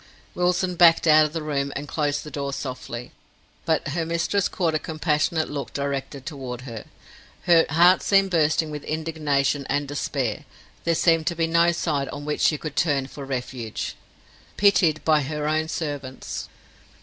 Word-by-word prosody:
Wilson 180 +1 +1
backed 170 -1 +6
out 155 -1 +6
of - - -12
the 165 -2 -3
room 140 -2 -1
and 145 +1 -5
closed 145 -2 -1
the 150 - -9
door 140 -1 -3
softly, 125 -3 -6 0.5
but 160 -2 0
her 165 +3 -1
mistress 170 +4 0
caught 170 -4 0
a 155 - +1
compassionate 155 0 0
look 145 -1 -5
directed 140 -1 -4
toward 130 -5 -6
her. 115 -4 -8 0.6
Her 170 -2 +5
heart 175 +5 +5
seemed 195 -1 +3
bursting 160 -1 +2
with 150 -1 -6
indignation 150 -3 0
and 145 0 0
despair; 135 -5 -2 0.4
there 170 0 +2
seemed 165 -1 +3
to 170 - 0
be 165 0 +1
no 170 +1 +3
side 150 -5 -1
on 145 - -7
which 150 0 -2
she 155 - +3
could 150 -1 -6
turn 145 -5 +1
for 140 +1 -9
refuge. 125 -4 -4 0.6
Pitied 180 -6 +3
by 155 -2 +4
her 150 +2 -3
own 155 +1 0
servants! 145 -5 -5
150 Hz, 165 wpm, -24 LUFS, 140-165 Hz, 0.6 s, backed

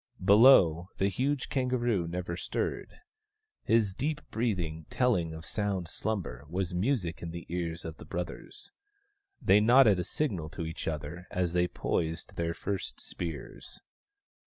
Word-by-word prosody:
Below, 95 -6 +7
the 95 - +2
huge 130 +7 -1
kangaroo 120 -8 0
never 85 0 -3
stirred. - - -4 0.6
His 110 -4 +2
deep 150 +8 -2
breathing, 85 -9 -2
telling 110 -11 +1
of 80 +1 -8
sound 100 -5 -2
slumber, 90 - -3
was 90 +1 -2
music 90 -3 0
in 85 - -5
the 85 0 -7
ears 85 -1 -3
of 80 -1 -6
the - - -11
brothers. 90 +1 -6 0.7
They 100 - +5
nodded 110 -3 +6
a - - 0
signal 95 - -2
to 85 - -2
each 80 0 -5
other 80 +3 -4
as 90 -2 -1
they 90 0 +3
poised 80 -1 -2
their 85 0 -1
first 100 -2 -4
spears. 80 -6 -7
90 Hz, 140 wpm, -30 LUFS, 85-110 Hz, 0.7 s, Below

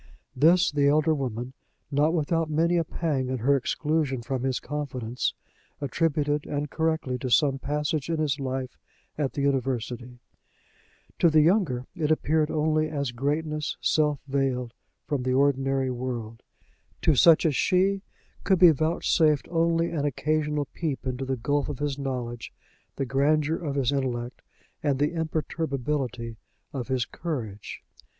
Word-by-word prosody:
This 170 +6 +5
the 145 -1 +2
elder 155 +2 +3
woman, 125 -3 -3 0.4
not 145 +3 +3
without 165 0 0
many 165 +3 +2
a 170 - +2
pang 150 -5 -2
at 130 -3 -2
her 140 +4 +4
exclusion 140 -1 -1
from 130 +1 -2
his 130 -1 0
confidence, 130 -5 -3 0.4
attributed, 150 0 0
and 145 0 -3
correctly, 160 -5 -1
to 130 - -3
some 135 +1 +3
passage 150 +2 -2
in 165 - 0
his 150 -2 0
life 130 -1 -4 0.4
at 145 -3 -1
the 140 - -2
university; 125 -3 -1 1.0
to 170 - +6
the 155 -1 +5
younger 155 - +2
it 160 -5 -1
appeared 155 0 +2
only 155 0 +1
as 140 -4 -2
greatness 150 +4 -2
self 150 -2 +2
veiled 130 -3 -1 0.3
from 145 -3 -1
the 130 0 0
ordinary 135 -1 +2
world: 120 -3 -5 0.6
to 160 - +5
such 165 +4 +6
as 150 -4 +2
she, 195 +4 +2 0.4
could 190 -1 +3
be 175 -1 +8
vouchsafed 155 -1 +2
only 165 0 +2
an 155 -4 -1
occasional 150 +1 0
peep 155 -6 -3
into 130 0 -3
the 130 0 -2
gulf 145 +5 0
of 145 - -4
his 145 0 -2
knowledge, 125 -3 -4 0.4
the 135 - -2
grandeur 150 +4 +2
of 145 -5 -4
his 135 -2 +1
intellect, 125 -3 -2 0.4
and 140 -2 +1
the 145 +4 +1
imperturbability 140 -7 -2 0.4
of 130 -4 -4
his 130 -3 0
courage. 120 - -6
145 Hz, 145 wpm, -26 LUFS, 130-155 Hz, 1.0 s, be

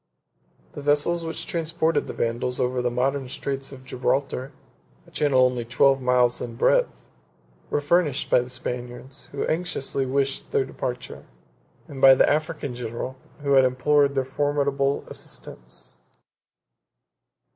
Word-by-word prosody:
The 145 - -7
vessels 150 +4 +2
which 165 0 -5
transported 165 -3 0
the - - -5
Vandals 120 +2 -2
over 125 0 0
the 125 - +1
modern 130 +2 -1
Straits 135 0 -4
of 130 -1 -11
Gibraltar, 130 +1 -1 0.5
a - - -19
channel 135 -4 +3
only 125 -1 0
twelve 135 +3 +3
miles 125 -1 +3
in 115 -1 -5
breadth, - - +2 0.6
were 145 - 0
furnished 150 -2 +2
by 125 - +4
the 125 - -8
Spaniards, 125 +2 -7
who 140 - -2
anxiously 155 -5 -1
wished 135 +1 -1
their 135 - +1
departure; 125 -1 -6 0.6
and 135 -2 -8
by 135 -1 +9
the - - +4
African 150 -3 -1
general, 120 +2 -5 0.3
who 140 - 0
had 135 -1 +7
implored 140 +2 +3
their 135 -1 +1
formidable 140 0 0
assistance. - - -8
135 Hz, 135 wpm, -25 LUFS, 125-145 Hz, 0.6 s, by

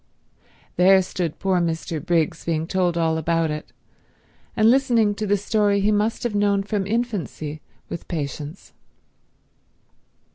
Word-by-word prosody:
There 190 +2 +6
stood 175 -3 -3
poor 190 -2 +1
Mr. 165 -2 -2
Briggs 165 -3 0
being 160 -1 -1
told 180 -1 0
all 160 -1 +1
about 165 0 0
it, 150 0 -6 0.9
and 215 0 +5
listening 240 -5 +3
to 210 +1 -4
the 205 +1 +3
story 205 0 +1
he 205 +2 +2
must 210 +2 0
have 240 -3 -1
known 205 -1 +2
from 200 -1 -2
infancy 200 -9 -3 0.3
with 170 - -7
patience. 150 +1 -5
185 Hz, 135 wpm, -23 LUFS, 165-205 Hz, 0.9 s, There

